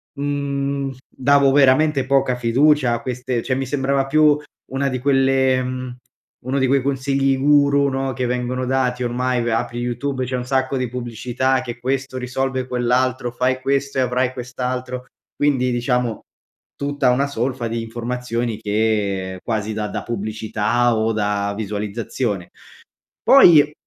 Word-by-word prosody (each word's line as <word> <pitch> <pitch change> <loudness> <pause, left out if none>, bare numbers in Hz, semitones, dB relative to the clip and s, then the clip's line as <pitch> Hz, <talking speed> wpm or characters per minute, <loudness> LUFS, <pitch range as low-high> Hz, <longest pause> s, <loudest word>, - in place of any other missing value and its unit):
mhmm, 140 -1 -2 0.2
davo 140 +1 +3
veramente 140 +1 +4
poca 135 -1 +2
fiducia 125 +2 +3
a 120 - -2
queste 125 -1 -3
cioè 130 - -1
mi 135 +1 -2
sembrava 135 0 0
più 150 +1 +4 0.3
una 135 +1 0
di 130 -1 -3
quelle 135 -1 +2
mhmm, 125 -1 -5 0.5
uno 135 +2 0
di 130 - +2
quei 135 +1 +3
consigli 135 0 0
guru, 140 0 +4
no, 135 0 -2
che 125 +1 -2
vengono 125 +1 -2
dati 125 -1 0
ormai 125 +1 0
v - - -3
apri 120 +1 -1
YouTube 130 +2 -2
c'è 130 +1 -3
un 125 - -3
sacco 130 +1 0
di 130 -2 -2
pubblicità 125 +2 -1
che, 120 -1 -7
questo 130 +1 -2
risolve 130 +1 -2
quell'altro, 125 0 0
fai 130 +2 0
questo 140 +1 -1
e - - +4
avrai 125 0 0
quest'altro, 125 0 -4 0.3
quindi 130 -3 +1
diciamo, 120 -1 -1 0.5
tutta 140 -2 +1
una 135 +3 +1
solfa 125 -2 -2
di 115 0 -2
informazioni 120 0 -3
che 105 -3 -1
quasi 110 -2 -2
da 105 0 -2
da - - -4
pubblicità, 110 +2 0
o 110 +1 +1
da 105 -1 -1
visualizzazione. 105 -1 -3 0.7
Poi, 155 - +7
125 Hz, 145 wpm, -20 LUFS, 120-135 Hz, 0.7 s, Poi